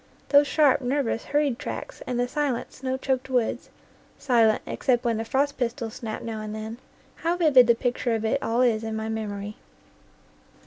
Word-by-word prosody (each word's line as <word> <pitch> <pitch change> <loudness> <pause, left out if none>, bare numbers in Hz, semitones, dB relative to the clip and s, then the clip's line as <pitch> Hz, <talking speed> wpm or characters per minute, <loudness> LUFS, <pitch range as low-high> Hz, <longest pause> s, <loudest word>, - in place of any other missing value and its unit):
Those 285 0 +6
sharp, 285 -3 +3
nervous, 255 -3 -1
hurried 290 -4 0
tracks - - -6
and 245 -1 -2
the 245 - +1
silent, 275 -2 -2
snow 260 0 -3
choked 265 0 -2
woods, 245 -3 -1 0.5
silent 230 -5 +3
except 245 -2 0
when 230 -2 +1
the 225 - -2
frost 280 +4 0
pistols 235 -2 -2
snapped 220 -2 -6
now 225 -2 -4
and 215 0 -5
then, 220 +2 -6 0.4
how 340 +2 -1
vivid 280 -8 +6
the 235 - +5
picture 245 0 -1
of 225 0 -2
it 220 - +1
all 230 +2 0
is 225 -3 +2
in 220 0 -3
my 220 0 -3
memory! 210 -2 -4
245 Hz, 180 wpm, -25 LUFS, 225-270 Hz, 0.5 s, Those